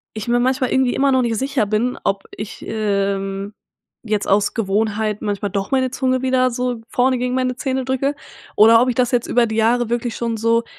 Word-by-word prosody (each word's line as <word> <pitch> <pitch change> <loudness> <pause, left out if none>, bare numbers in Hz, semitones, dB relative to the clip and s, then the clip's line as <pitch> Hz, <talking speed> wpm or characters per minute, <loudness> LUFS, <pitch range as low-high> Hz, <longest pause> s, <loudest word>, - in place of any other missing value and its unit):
ich 215 +1 -5
mir 240 0 +3
manchmal 255 0 0
irgendwie 260 -2 +2
immer 275 0 +2
noch 260 - +3
nicht 230 -2 -1
sicher 270 -4 0
bin, 220 +4 0
ob 195 0 -1
ich, 210 0 -8
ähm, 200 -1 -2 0.5
jetzt 210 -2 -1
aus 200 +1 +2
Gewohnheit 215 0 -1
manchmal 205 -1 -2
doch 195 -1 -2
meine 260 -1 +1
Zunge 255 -1 0
wieder 255 -1 +2
so 245 -1 -2
vorne 255 0 +1
gegen 250 +1 -1
meine 255 -1 0
Zähne 265 -2 -2
drücke 265 +2 -1 0.4
oder 230 +2 +7
ob 255 - +2
ich 245 - -1
das 250 -2 +1
jetzt 245 -2 0
über 240 -1 +3
die 220 - -4
Jahre 235 +1 +2
wirklich 240 -1 -2
schon 230 -1 -2
so 230 +1 +2
235 Hz, 205 wpm, -19 LUFS, 215-255 Hz, 0.5 s, oder